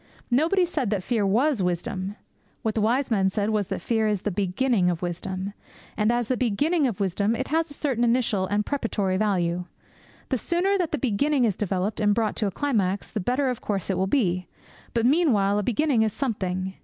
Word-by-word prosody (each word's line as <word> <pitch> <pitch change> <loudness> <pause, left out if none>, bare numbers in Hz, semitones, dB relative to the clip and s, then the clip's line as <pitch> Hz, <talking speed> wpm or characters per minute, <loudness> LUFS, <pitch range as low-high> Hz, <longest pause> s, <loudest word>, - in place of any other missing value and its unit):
Nobody 330 +9 +3
said 295 - -2
that 200 -3 -1
fear 220 -3 +1
was 245 +4 +2
wisdom. 185 +2 -2 0.5
What 220 - 0
the 220 - 0
wise 245 +5 +1
man 195 -3 +3
said 205 +2 -1
was 210 -3 0
that - - -4
fear 220 -2 +1
is 205 -3 -1
the 210 - -1
beginning 195 +1 +1
of 175 0 -2
wisdom. 185 +3 -4 0.4
And 215 +1 +2
as 240 -1 0
the 255 - +1
beginning 275 - +1
of 225 -7 -4
wisdom 200 +3 +1
it 260 - -3
has 325 +2 +1
a 290 - -12
certain 260 -6 -1
initial 230 -5 +2
and 205 +2 0
preparatory 210 -9 -1
value. 180 -4 0 0.6
The 260 - 0
sooner 355 - +1
that 345 -3 0
the 305 - 0
beginning 265 +3 +1
is 210 -5 +1
developed 195 +1 -2
and 205 -1 +3
brought 225 -2 0
to 215 - +1
a - - -2
climax, 205 -6 -1
the 215 - -2
better 250 +8 0
of 250 - -3
course 195 -2 -2
it - - 0
will 190 - +1
be. 185 -7 +1 0.5
But 230 0 +2
meanwhile 235 - +3
a - - -1
beginning 250 +2 +2
is 220 -2 +1
something. 190 -7 -2
215 Hz, 205 wpm, -25 LUFS, 195-255 Hz, 0.6 s, Nobody